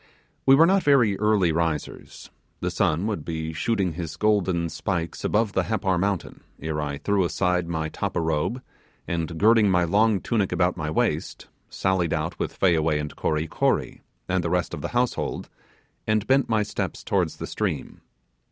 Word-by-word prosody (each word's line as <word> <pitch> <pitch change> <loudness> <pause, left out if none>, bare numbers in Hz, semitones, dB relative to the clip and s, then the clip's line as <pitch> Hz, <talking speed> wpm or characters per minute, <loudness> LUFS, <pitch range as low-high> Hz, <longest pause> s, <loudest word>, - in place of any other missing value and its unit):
We 135 - +8
were 160 +4 +7
not 195 +2 +3
very 125 - +4
early 105 -5 +3
risers 80 -2 -3 0.3
the - - -2
sun 80 +5 +1
would 105 -8 -2
be 80 -1 -4
shooting 95 +1 0
his 80 -1 -6
golden 95 -5 +1
spikes 85 -3 -3
above 105 -1 +1
the 95 - +1
Happar 95 -5 0
mountain, 100 -1 -2 0.2
ere 80 -1 -3
I 70 -1 -3
threw 100 +4 +1
aside 90 0 0
my 80 -2 -2
tappa 80 - -3
robe, 80 +10 -1 0.4
and 85 -1 -3
girding 110 +1 +5
my 90 -1 +3
long 105 +4 +3
tunic 105 -4 0
about 90 0 +1
my 75 -3 -3
waist, 80 - -1 0.2
sallied 95 -4 0
out 80 +2 -3
with - - -3
Fayaway 80 -4 +3
and 75 0 -5
Kory 75 0 -1
Kory, - - -1 0.3
and 95 -1 0
the 85 - -1
rest 90 0 0
of - - -5
the - - -2
household, 125 0 -1 0.6
and 110 -1 +1
bent 135 0 +2
my 110 -2 +2
steps 105 - -4
towards - - 0
the - - -5
stream. - - -4
90 Hz, 170 wpm, -25 LUFS, 80-105 Hz, 0.6 s, We